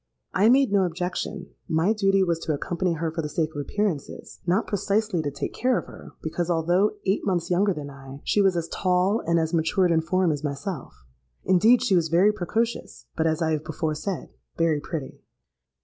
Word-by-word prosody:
I 205 +4 +4
made 265 -2 +4
no 200 -1 +4
objection; 180 +2 -4 0.2
my 165 +7 +2
duty 195 -2 +3
was 170 -3 0
to 160 - -2
accompany 175 +4 -1
her 165 0 -2
for 165 +1 -3
the 150 - -4
sake 155 0 -1
of 145 - -3
appearances—not 185 +2 -2
precisely 205 -2 0
to 145 - -2
take 140 - -5
care 255 0 +1
of - - -4
her, - - -12
because, 170 +2 -2
although 175 +5 +2
eight 195 +1 +1
months 175 -3 -1
younger 195 +3 +3
than 145 -5 -5
I, 135 0 -11
she 205 - +2
was 190 -3 +3
as 165 -1 -2
tall 185 +3 +1
and 170 0 +3
as 160 0 -1
matured 170 +3 +2
in 160 -1 +3
form 180 +1 +1
as 145 -1 -3
myself. 140 - -5 0.4
Indeed 215 +7 +5
she 215 -7 +3
was 165 -2 +2
very 180 +6 +5
precocious, 220 +4 -3
but, 160 0 +1
as 160 +1 0
I 160 - +1
have 155 -1 -1
before 160 -1 -2
said, 180 +3 -4 0.3
very 165 -3 +2
pretty. 150 -2 -6
175 Hz, 195 wpm, -25 LUFS, 160-195 Hz, 0.4 s, Indeed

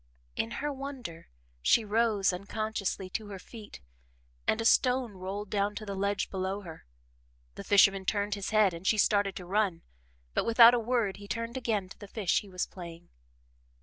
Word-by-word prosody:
In 110 - -1 0.2
her 295 - -1
wonder, 265 -11 -7 0.3
she 220 - +4
rose 210 -3 +2
unconsciously 200 0 -3
to 215 +1 -4
her 200 -1 -7
feet 210 - -12 0.7
and 220 - +2
a 225 - -2
stone 250 0 +3
rolled 195 +2 -6
down 205 0 0
to 215 - -6
the 200 - -4
ledge 200 0 -1
below 190 +1 -2
her. 165 - -11 0.7
The - - -8
fisherman 195 -1 +4
turned 205 +1 0
his 200 -1 -3
head 215 -4 +4
and 170 +3 -6
she 220 - +3
started 205 -2 +2
to 180 - -7
run, 190 -3 0 0.5
but - - +1
without 230 +1 +8
a 245 - +3
word 230 -4 0
he 200 0 -11
turned 230 +3 -4
again 225 -6 -1
to - - -13
the 205 - -9
fish 200 -3 0
he 205 - -14
was 180 -1 -2
playing. 170 -2 -11
205 Hz, 180 wpm, -30 LUFS, 190-220 Hz, 0.7 s, without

